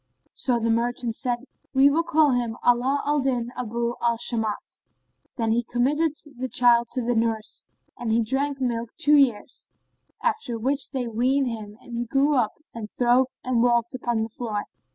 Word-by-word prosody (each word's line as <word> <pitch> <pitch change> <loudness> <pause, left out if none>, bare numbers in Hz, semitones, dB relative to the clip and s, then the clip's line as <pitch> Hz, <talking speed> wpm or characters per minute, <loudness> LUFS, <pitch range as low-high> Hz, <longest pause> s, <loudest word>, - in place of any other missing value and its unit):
So 250 -3 +1
the 230 0 +1
merchant 235 0 -1
said, 245 0 -2 0.3
"We 275 +1 +6
will 320 +4 +2
call 315 -3 +3
him 240 -2 -1
Ala 255 +4 +2
al 295 +1 +2
Din 250 -3 -1
Abъ 235 0 -2
al 235 -1 +2
Shбmбt."[FN#30] 225 -3 -3 0.6
Then 225 -2 0
he 235 +2 +2
committed 280 +7 0 0.3
the 260 0 -3
child 235 -1 +4
to 255 - -1
the 245 +1 +1
nurse, 225 -1 -1 0.3
and 235 -2 -2
he 230 +1 +3
drank 275 +4 -1
milk 235 -3 -2
two 300 +1 +4
years, 260 -7 +1 0.6
after 440 - -1
which 270 +5 +1
they 260 -3 -3
weaned 255 +4 +1
him 215 -2 -7
and 240 - -9
he 240 +1 -2
grew 275 +5 +2
up 240 -6 +1 0.2
and 220 -2 -7
throve 245 +2 +3 0.2
and 250 -2 +1
walked 235 0 +2
upon 240 -3 -1
the 225 - -4
floor. 215 -2 -4
240 Hz, 175 wpm, -25 LUFS, 230-265 Hz, 0.6 s, We